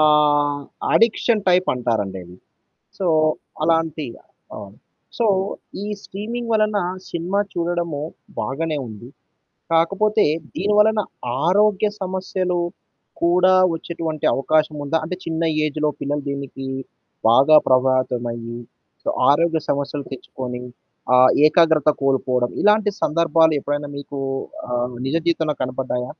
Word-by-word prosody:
ఆహ్, 145 -1 +3 0.3
addiction 230 -1 +3
type 185 0 +4
అంటారండది. 100 -7 -3 0.6
So, 190 - -1 0.6
అలాంటి 165 -1 +1 0.5
అవును. 100 0 -10 0.4
సో, 235 - +1 0.6
ఈ - - -4 0.2
స్ట్రీమింగ్ 230 +4 -5
వలన 215 -1 +2 0.3
సినిమా 175 +4 -1
చూడడము 170 -3 -2 0.4
బాగానే 155 +2 -2
ఉంది. 110 +2 -10 0.6
కాకపోతే 195 +6 +3 0.3
దీనివలన 210 +2 +3 0.4
ఆరోగ్య 205 +3 +3
సమస్యలు 185 -1 -2 0.6
కూడా 180 +2 +4 0.2
వచ్చేటువంటి 165 -2 -4
అవకాశం 155 +3 +1
ఉందా? 155 +3 +1
అంటే 180 +3 -4
చిన్న 160 0 -2 0.2
ఏజ్‌లో 150 0 -1
పిల్లలు 145 0 -2
దీనికి 140 -1 -6 0.6
బాగా 135 +7 +6
ప్రభావితమయ్యి. 125 -2 0 0.4
సో - - -6 0.2
ఆరోగ్య 165 +2 +2
సమస్యలు 140 0 -2
తెచ్చుకొని. 125 -1 -6 0.5
ఆ - - +7 0.3
ఏకాగ్రత 155 -1 +4
కోల్పోవడం. 130 -2 +1
ఇలాంటి 210 0 +4
సందర్భాలెప్పుడైనా 150 -2 +2
మీకు 140 0 -7 0.5
ఆహ్, 125 0 -2
నిజ 140 +5 0
జీవితంలో 160 -3 0
కనపడ్డాయా? 125 -1 -3
155 Hz, 100 wpm, -21 LUFS, 135-180 Hz, 0.6 s, ఆ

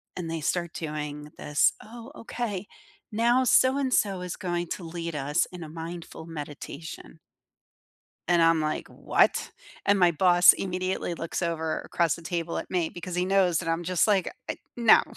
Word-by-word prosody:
and 165 -3 -4
they 165 - -2
start 170 +2 -1
doing 150 -1 -5
this, 145 0 +2
"Oh, 235 +3 -11
okay. 210 -4 -4 0.5
Now 240 +4 +3
so-and-so 255 -8 +3
is 180 -1 -4
going 175 -3 -2
to 180 - -4
lead 170 0 -5
us 145 +1 +1
in 180 - -8
a 155 - -7
mindful 165 0 -7
meditation." 155 0 -8 1.1
And 175 -1 +4
I'm 165 -1 +4
like, 155 0 -2
"What?" - - +1 0.3
And 200 0 +4
my 175 -2 +6
boss 175 +2 +7
immediately 185 -1 -2
looks 165 +2 -4
over 160 -2 -1
across 170 -3 0
the 170 - -10
table 170 0 -3
at - - -6
me 175 -3 +1
because 175 +1 -7
he 180 +1 +1
knows 185 -3 +3
that 165 - -4
I'm 165 +1 0
just 180 +1 +2
like, 200 - +2 0.2
"Uh, - - -1 0.2
no." 235 -2 +6
175 Hz, 165 wpm, -27 LUFS, 165-190 Hz, 1.1 s, boss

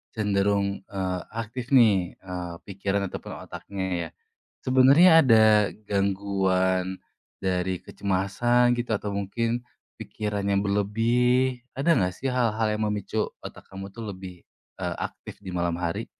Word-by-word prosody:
cenderung, 100 -1 +1
eee, 95 -3 -2 0.2
aktif 115 +3 -5
nih, 100 -8 +4
eee, 90 -2 -5
pikiran 100 0 -2
ataupun - - -7
otaknya 100 -1 -6 0.2
ya. - - -15 0.6
Sebenarnya 135 +7 +6 0.2
ada 110 -3 +6 0.4
gangguan 95 -2 0 0.4
dari 90 -1 0
kecemasan 120 +6 +1
gitu, 120 -1 -3
atau 105 0 -4
mungkin 115 +4 -2 0.4
pikiran 105 -2 -4
yang 100 0 +2
berlebih, 120 +5 +1
ada 150 +6 +3
enggak 90 -1 +1
sih 135 - -3
hal-hal 115 -3 +1
yang 105 0 -1
memicu 105 +1 -2 0.2
otak - - -10
kamu 95 0 -8
tuh 115 - -6
lebih, 90 -2 -11 0.3
eee, - - -2
aktif - - -7
di 95 - -7
malam 85 -1 -1
hari? 85 -1 -2
100 Hz, 130 wpm, -26 LUFS, 95-115 Hz, 0.6 s, Sebenarnya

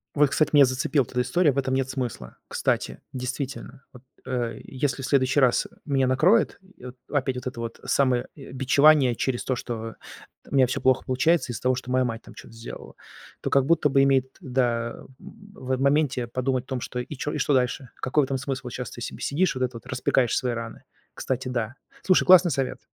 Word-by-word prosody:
Вот, 145 -1 +4
кстати, 145 +2 +2
меня 145 -2 +8
зацепила 130 +2 0
т - - -16
эта 125 - +1
история. 160 +5 +2
В - - -7
этом 130 -1 0
нет 130 0 0
смысла. 125 - -5
Кстати, - - -1
действительно, 130 +1 -5
вот, 125 -1 -14 0.2
э, 120 -4 -3
если 135 0 -2
в - - -2
следующий 130 0 +2
раз 130 -3 +3 0.2
меня 135 -3 +1
накроет, 165 - +3 0.2
и - - -14
вот 125 0 -9
опять 135 -3 0
вот 125 - -5
это 125 -2 -6
вот 115 -1 -6
самое, 130 -3 +1
э, 140 - -11
бичевание 135 0 +4
через 125 +1 -2
то, 130 - 0
что 115 -2 -5 0.5
у - - -12
меня 130 -2 +5
всё 125 - -3
плохо 130 -1 +2
получается 135 +1 +1
из-за - - -6
того, 130 0 +2
что 130 0 -7
моя 130 0 +3
мать 115 -2 -3
там - - -13
чё-то - - -13
сделала, 115 +1 -10 0.4
то - - -3
как 135 -2 +3
будто 165 0 +3
бы 135 -1 +3
имеет, 135 -1 +3
да, 120 -5 -1 0.2
в, 200 -10 -10
э, 130 - +2
в - - -5
моменте 140 -3 +2
подумать 130 +1 -1
о - - -42
том, 130 -2 -3
что 125 - -5
и 125 +4 -6
чё, 150 +3 -3
и - - -3
что 145 - +1
дальше? 125 0 0
Какой 140 +3 +1
в - - 0
этом 135 0 -2
смысл? 135 0 -4
Вот 125 - -6
щас 125 - -5
ты - - -10
себе - - -6
сидишь 165 +2 +1
вот 130 - -4
этот 125 -1 -2
вот, 115 - -10
распекаешь 130 -2 +1
свои 125 - 0
раны. 115 -1 -7 0.3
Кстати, 130 0 -3
да. 120 -1 -3 0.3
Слушай, 185 - +4
классный 180 -2 +7
совет. 135 -1 -2
130 Hz, 220 wpm, -25 LUFS, 125-140 Hz, 0.5 s, меня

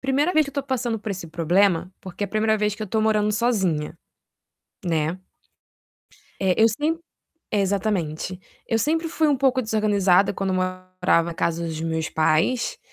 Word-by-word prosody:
1ª 280 +6 +1
vez 310 0 +4
que 280 - -7
eu - - -28
tô 280 - -1
passando 245 -4 -2
por 210 0 -6
esse 185 -3 -5
problema, 175 +2 +2
porque 190 +2 -5
é - - -3
a - - -13
1ª 215 +2 +1
vez 210 -1 0
que 215 - -7
eu - - -3
tô 220 +3 0
morando 215 -1 +2
sozinha, 190 -9 0 0.9
né? 165 0 0 1.2
É, 190 -2 +2
eu 225 - +7
sem 300 +9 -1 0.5
exatamente. 190 -4 -1 0.3
Eu 225 - +1
sempre 320 +7 0
fui 320 -1 +1
um 285 - +3
pouco 265 0 +2
desorganizada 200 -4 +3
quando 195 -1 -2
morava 185 -1 0
na 170 - -5
casa 170 0 -1
dos 160 -1 -4
meus 160 -1 -2
pais, 200 - +1
200 Hz, 170 wpm, -23 LUFS, 180-230 Hz, 1.2 s, eu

